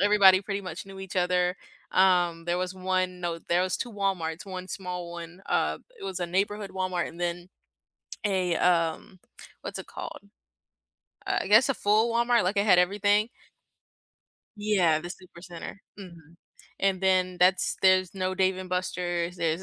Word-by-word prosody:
everybody 195 -2 +6
pretty 200 0 -3
much 180 -2 -7
knew 195 0 -10
each 190 0 -7
other. 180 0 +1 0.3
Um, 175 -3 +3
there 175 +1 0
was 185 0 -3
1, 185 -1 -1
no 170 -1 -2
there 175 +2 +1
was 185 - 0
2 240 -3 -4
Walmarts, 190 -4 -2
1 185 -1 -7
small 180 -2 -5
1 175 +2 -9
uh, - - 0 0.2
it - - -8
was 190 -1 -4
a 175 - -1
Neighborhood 200 +3 -1
Walmart 185 -2 -2
and 170 - -12
then 175 +1 -3 0.8
a, 185 -4 +1
um 170 +1 +1 0.4
what's - - -6
it - - -9
called? - - -7 1.1
Uh, - - +1
I - - -5
guess 220 +6 +6
a 270 - +1
full 215 +3 +2
Walmart, 235 0 +3
like, 190 +3 0
it 200 - +3
had 180 -4 +6
everything. 205 +4 +2 1.3
Yeah, 185 -7 +2
the 175 - -7
Supercenter, 175 -1 -9 0.2
mhm. 170 -4 -13 0.4
And 195 -1 +1
then 185 -1 +2
that's 180 +1 +3
there's 185 -1 +4
no 185 0 -1
Dave 185 0 +2
and 185 0 -7
Buster's, 180 -1 -2
there's 165 +1 -1
185 Hz, 165 wpm, -27 LUFS, 175-195 Hz, 1.3 s, everybody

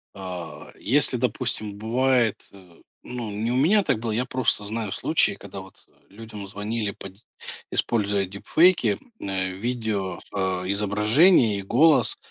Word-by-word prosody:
А 90 -5 -8
если, 135 +1 +2
допустим, 115 -3 -3
бывает, 120 +1 +1
э, 90 -3 -18 0.2
ну, 120 -3 -6
не 110 +3 -2
у - - 0
меня 195 +10 +4
так 110 - 0
было, 115 -1 -3
я 120 +4 0
просто 125 -5 0
знаю 110 -1 -4
случаи, - - +1
когда - - -10
вот - - -13 0.3
людям 105 -1 -10
звонили, 105 +1 -3
по 95 - -10
д 95 - -21 0.5
используя 100 -3 +3
дипфейки, 160 - +2 0.2
э, 95 -1 -2
видео, 105 -2 -3
э, - - -5 0.3
изображений 105 - +3
и - - -6
голос 145 +10 +3
110 Hz, 140 wpm, -24 LUFS, 100-125 Hz, 0.5 s, меня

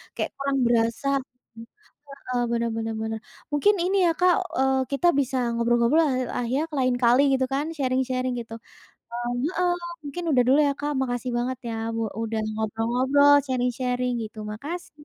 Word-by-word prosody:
kayak - - -2
kurang 275 0 -1
berasa 230 +2 +1 1.0
heeh. 255 -3 -3
Benar 235 0 0
benar 225 0 -3
benar, 220 0 -3 0.3
mungkin 410 +8 +4
ini 385 +2 +1
ya - - +4
Kak, 360 -1 +5 0.2
eee, 265 0 +2
kita 345 +6 +2
bisa 265 0 -2 0.2
ngobrol-ngobrol 235 +5 +3
lah 300 - +2 0.3
ah 245 - -1
ya 290 - +1 0.2
lain 255 -1 +2
kali 245 +3 +5 0.2
gitu 260 - +1
kan, 285 +2 0
sharing-sharing 255 -1 0
gitu. 225 -1 -8 0.6
Eee 240 0 -3 0.2
heeh. 360 -1 +1 0.3
Mungkin 315 +5 -5
udah 250 - +4
dulu 270 - +6
ya - - +1
Kak, 295 0 -1
makasih 245 -1 -2
banget 250 +1 -2
ya 225 - -3 0.2
u - - -1 0.2
udah 225 -1 -2 0.2
ngobrol-ngobrol, 250 +6 +3
sharing-sharing 250 0 -1
gitu, 215 +1 -10
makasih. 300 +6 -7
255 Hz, 160 wpm, -25 LUFS, 235-280 Hz, 1.0 s, dulu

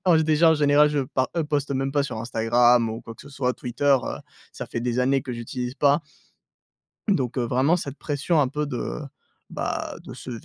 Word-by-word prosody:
en 175 -3 +5
déjà 160 +1 +4
en - - +5
général, 150 0 +4
je 145 -1 0
pa 130 -1 +1
heu, 165 - +1
poste 145 -2 -1
même 135 0 -1
pas 145 -1 +2
sur 125 - -5
Instagram 115 +1 +3
ou 110 - -5
quoi 115 - -9
que - - -15
ce 140 - -13
soit, 130 -2 -1
Twitter, 135 +3 +1
heu, - - -4 0.4
ça - - -6
fait 115 - -4
des 120 0 -1
années 135 +1 +2
que 130 - -5
j'utilise 125 +2 -5
pas. 145 +1 +3 1.1
Donc 130 - +1
heu, 125 - +1
vraiment 130 +8 +2
cette 140 -5 -6
pression 150 +2 0
un 135 - +2
peu 150 +2 -2
de, 125 +1 -4 0.5
bah, - - -3
de - - -9
se 130 - -9
135 Hz, 215 wpm, -24 LUFS, 125-150 Hz, 1.1 s, en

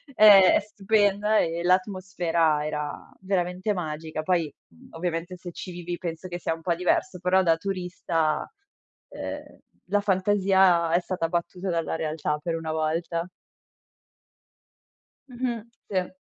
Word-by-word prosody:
è 200 -3 +8
è - - +5
stupenda 210 0 +1
e 170 +1 -1
l'atmosfera 180 -4 +1
era 150 -1 -4
veramente 185 +1 -1
magica. 155 -3 -4
Poi, 165 -3 0 0.4
ovviamente, 170 +1 -3
se 175 0 -8
ci 180 - -8
vivi 175 0 -5
penso 170 +1 -5
che 175 0 -5
sia 165 - -1
un 165 - -9
po' 170 +1 +1
diverso, 180 +1 0
però 185 +2 +3
da 165 -2 +4
turista, 180 -3 -2 0.6
uhm, - - -7 0.3
la 205 +1 +2
fantasia 190 -3 +3
è 175 - +5
stata 180 -2 -2
battuta 180 +2 -3
dalla 165 -2 -1
realtà, 155 -1 -2
per 165 +1 -2
una 160 -1 -4
volta. 165 +2 -1 2.0
Mh-mh, 240 -2 -3 0.3
se. 185 -2 -1
175 Hz, 130 wpm, -26 LUFS, 165-190 Hz, 2.0 s, è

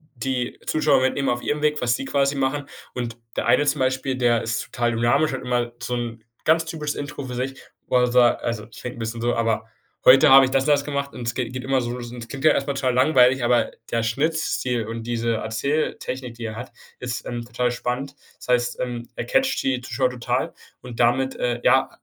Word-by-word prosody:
die 125 0 -2
Zuschauer 155 -4 +3
mitnehmen 135 +1 0
auf 120 0 -1
ihrem 150 0 -1
Weg, 150 -1 +1
was 120 -1 +2
sie - - -5
quasi 140 +1 +1
machen. 140 +1 -1 0.3
Und 120 -2 -4 0.2
der - - -1
eine 145 - +4
zum 145 0 +1
Beispiel, 130 0 0
der 120 -2 +3
ist 115 0 -2
total 120 -1 -1
dynamisch 120 +6 +2
und 130 - -4
immer 120 -1 -1
so 125 - -2
'n 115 -2 -5 0.2
ganz 160 +1 +4
typisches 150 -2 -4
Intro 145 0 -5
für 125 -1 -6
sich 130 +2 -4 0.3
wo 125 - +3
er 125 0 +4
sa 120 -1 +5
also 115 -3 -4
ich 110 - -12
rede 125 - -5
'n - - -11
bisschen 115 +1 -4
so, 120 0 +1
aber: 115 -1 0 0.4
„Heute 135 +4 +8
habe 135 0 +9
ich 130 - -3
das 135 0 +2
und 150 - -1
das 145 -1 +2
gemacht.“ 140 -1 -3
Und 120 -2 -6
es 115 - 0
geht 125 -2 -2
geht 130 0 -5
immer 135 -1 +1
so 120 - -3
los. 120 -1 -6
Und 125 - -8
es - - -11
klingt 135 +3 -5
ja - - +8
erstmal 140 0 0
total 130 -2 0
langweilig, 130 -1 +4
aber 120 0 +2 0.2
der 115 -1 +1
Schnittstil 125 -2 -1
und 115 0 -5
diese 115 0 -1
Erzähltechnik, 125 +2 -2
die 115 -1 -7
er 110 - -5
hat, 125 +3 -7 0.3
ist, 120 -2 -4
ähm, 120 -1 -4
total 125 +1 -1
spannend. 125 +3 -3 0.2
Das - - -13
heißt, 125 0 +1
ähm, 120 -1 -4
er - - -4
catcht 265 - +1
die 130 -2 0
Zuschauer 130 +1 0
total. 125 +1 -2 0.3
Und 125 -2 -9
damit, 130 +3 +2
äh, 120 -1 -1
ja, 130 +1 +4
125 Hz, 230 wpm, -23 LUFS, 120-135 Hz, 0.4 s, habe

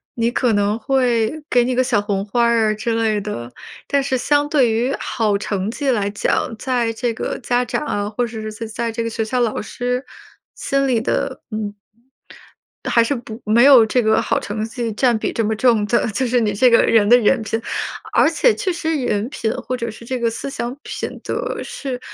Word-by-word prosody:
你 235 0 +1
可 245 -2 +1
能 205 +2 +1
会 240 -3 +1 0.2
给 245 -1 +3
你 250 +1 -1
个 255 - +3
小 235 -5 +1
红 200 -1 -2
花 235 +4 +1
儿 230 -2 +3
啊 - - 0
之 225 +2 -2
类 220 -2 +1
的。 120 - -6 0.3
但 280 - +1
是 265 -1 0
相 290 +3 +1
对 260 -7 +3
于 245 +5 0
好 210 -4 0
成 200 -1 -2
绩 270 +4 -1
来 205 -4 0
讲， 210 +2 -1
在 240 -1 0
这 235 +1 -2
个 - - -4
家 245 -1 0
长 295 - -3
啊， 205 -4 -2
或 240 +3 -1
者 225 -2 -6
是 - - -7 0.2
在 230 +1 -3
这 230 +1 -3
个 230 - -2
学 225 - -2
校 250 +3 -1
老 230 -3 0
师 250 +4 -3 0.5
心 275 0 0
里 240 -3 +2
的， 255 +3 -2
嗯。 210 -1 -4 1.1
还 235 - +3
是 260 +5 0
不 235 -2 -8
没 225 +3 +4
有 265 -5 +8
这 245 +3 +1
个 220 +1 +3
好 - - 0
成 215 +1 -4
绩 230 0 -4
占 240 +2 +2
比 - - -2
这 230 - -1
么 220 +1 0
重 225 -2 +3
的， 235 - +1
就 255 +6 -1
是 245 0 +2
你 215 -2 +1
这 250 +5 +4
个 230 - +6
人 220 -3 +3
的 245 +2 +7
人 240 +2 +3
品。 225 +1 -2 0.5
而 - - +4
且 485 - +3
确 370 - -1
实 325 -1 -2
人 210 0 0
品 225 -6 -2
或 255 - -4
者 235 -2 -4
是 220 +2 -12
这 255 +2 -3
个 235 -1 +1
思 230 - -5
想 245 -2 -4
品 - - -6
德 - - -3
是 260 -3 -5
230 Hz, 235 characters per minute, -20 LUFS, 215-250 Hz, 1.1 s, 有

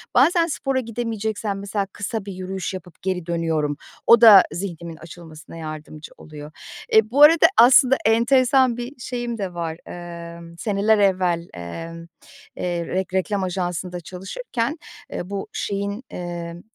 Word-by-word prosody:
Bazen 330 +6 +4
spora 270 -4 -1
gidemeyeceksem, 220 -3 -3
mesela, 200 0 -2
kısa 205 0 -4
bir 200 - -6
yürüyüş 185 0 -5
yapıp 180 -2 -10
geri 185 -2 -2
dönüyorum. 160 -4 -1 0.3
O 235 0 +7
da 205 -5 +10
zihnimin 170 -3 -6
açılmasına 165 -1 -12
yardımcı 155 -1 -8
oluyor. 150 -1 -11 0.4
Eee, 220 +1 +4
bu 285 +3 +2
arada, 315 +2 +8
aslında, 260 +2 +7
enteresan 245 +2 +3
bir 245 +3 -6
şeyim 240 -2 -4
de 190 -3 -4
var. 165 -1 -4
Emm, 170 -1 -9
seneler 210 +1 +1
evvel, 180 -3 +1
emm, 165 - -8 0.5
eee, 175 -1 -3
rek 185 0 -3
reklam 190 +1 0
ajansında 180 -1 -3
çalışırken, 230 - -4 0.4
eee, 175 - -5
bu 200 -1 -4
şeyin, 200 +3 -3
emm, 175 -1 -6
190 Hz, 135 wpm, -22 LUFS, 170-225 Hz, 0.5 s, da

